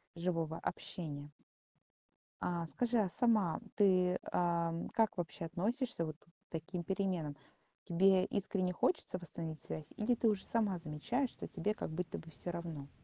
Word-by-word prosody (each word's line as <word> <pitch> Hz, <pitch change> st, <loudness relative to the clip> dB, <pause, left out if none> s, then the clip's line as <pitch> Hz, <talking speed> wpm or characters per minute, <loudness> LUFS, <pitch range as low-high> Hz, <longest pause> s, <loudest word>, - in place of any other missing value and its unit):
живого 165 Hz, -2 st, 0 dB
общения. 145 Hz, -4 st, -4 dB, 1.1 s
А 170 Hz, -1 st, 0 dB
скажи, 240 Hz, +7 st, +1 dB
а 195 Hz, -4 st, +3 dB
сама 210 Hz, -5 st, +3 dB, 0.2 s
ты, 185 Hz, -3 st, +5 dB
ам, 170 Hz, -1 st, +1 dB
как 225 Hz, -3 st, +2 dB
вообще 170 Hz, -1 st, -3 dB
относишься 200 Hz, -, 0 dB
вот 155 Hz, -1 st, -4 dB
к -, -, -27 dB, 0.2 s
таким 170 Hz, +2 st, -3 dB
переменам? 180 Hz, -5 st, 0 dB, 0.5 s
Тебе 185 Hz, +2 st, +5 dB
искренне 190 Hz, -2 st, 0 dB
хочется 185 Hz, -, +1 dB
восстановить 165 Hz, -2 st, -5 dB
связь 155 Hz, -1 st, -6 dB
или 230 Hz, +3 st, +3 dB
ты 230 Hz, -1 st, +4 dB
уже 205 Hz, -3 st, 0 dB
сама 210 Hz, -5 st, +2 dB
замечаешь, 175 Hz, -, -1 dB
что -, -, -7 dB
тебе 210 Hz, -, 0 dB
как -, -, -4 dB
будто 165 Hz, +2 st, -3 dB
бы 160 Hz, 0 st, -9 dB
всё 175 Hz, -, -5 dB
равно? 165 Hz, -5 st, -5 dB
175 Hz, 145 wpm, -36 LUFS, 165-200 Hz, 1.1 s, ты